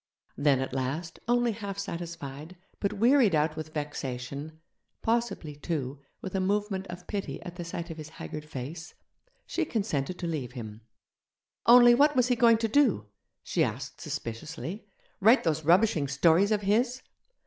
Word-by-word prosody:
Then 145 -2 +3
at 130 -1 -4
last, 140 +6 -3
only 240 0 +3
half 200 -2 -6
satisfied, 170 -4 -6 0.2
but 200 - -1
wearied 235 - +4
out 155 +1 +1
with 155 0 -6
vexation 145 0 -5 0.4
possibly, 225 -10 -1
too, 145 -3 -3 0.2
with 190 - -5
a 190 - +1
movement 195 0 -1
of 180 0 -9
pity 200 -2 -4
at 175 - -8
the 175 - -5
sight 170 0 -5
of 165 - -8
his 155 -1 -8
haggard 150 -1 -7
face 150 +3 -7 0.5
she 345 - -1
consented 185 - -2
to 175 - -5
leave 145 -8 -3
him. 110 -3 -8 0.9
Only, 240 0 +9
what 290 +4 +4
was 250 -1 +3
he 250 - +3
going 230 -1 +5
to 225 0 0
do? 220 - +2 0.3
she - - +1
asked - - -4
suspiciously; 160 - -6 0.3
write 225 +7 +6
those 160 -2 0
rubbishing 170 -3 +4
stories 165 +8 +4
of 210 -1 +2
his? 240 +6 +1
170 Hz, 160 wpm, -28 LUFS, 150-215 Hz, 0.9 s, Only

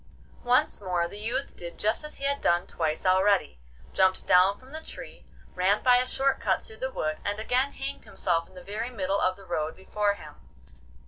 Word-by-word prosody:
Once 245 -3 +2
more 180 -3 0
the 200 +4 -9
youth 240 +6 -2
did 170 -1 -8
just 215 +7 +1
as 300 - -3
he - - -9
had 280 0 +1
done 175 +1 +2
twice 160 0 -2
already; 185 - +3 0.3
jumped 190 0 +3
down 185 +2 +5
from 260 +1 -17
the 315 +1 -6
tree, - - -9 0.3
ran 195 +3 +2
by 250 -1 +6
a 250 +1 +1
short 270 +1 +1
cut 190 -2 0
through 220 - -13
the 260 - -1
wood, 155 -9 -2
and 205 0 -1
again 255 +5 +1
hanged 275 +1 -5
himself 165 -3 -1
in 185 - -20
the 180 - -10
very 215 +5 -4
middle 200 -4 -1
of 185 0 +2
the 195 - -15
road 160 -3 -2
before 205 +2 0
him. - - -11
200 Hz, 205 wpm, -27 LUFS, 180-250 Hz, 0.3 s, by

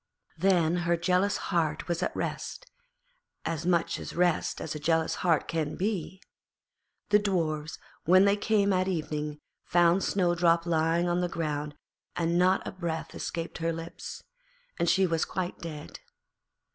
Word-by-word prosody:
Then 175 -2 +3
her 170 -1 +1
jealous 185 +3 +2
heart 160 -4 -1
was 170 0 -1
at - - -1
rest, - - -4 0.8
as 165 +1 -2
much 170 -2 +1
at - - -7
rest 175 -1 +1
as 160 - -4
a 150 - -5
jealous 160 +1 +1
heart 165 -4 +2
can 155 -2 -2
be. 190 -2 -2 0.9
The 210 0 +6
Dwarfs, 160 -6 -1 0.3
when 185 +3 +6
they 200 0 +4
came 205 -1 +2
at 185 0 +1
evening, 150 -4 -3 0.2
found 175 +2 +3
Snowdrop 175 -2 +2
lying 165 +1 +2
on 175 +1 +1
the 180 - 0
ground 150 -3 -3 0.4
and 170 0 +1
not 185 +1 +3
a - - -3
breath 170 -4 -4
escaped 165 +1 -5
her 165 0 0
lips, 165 +1 -7 0.6
and 170 - +2
she 190 0 +4
was 165 -3 +1
quite 185 0 -3
dead. 155 -3 -8
170 Hz, 150 wpm, -28 LUFS, 160-185 Hz, 0.9 s, The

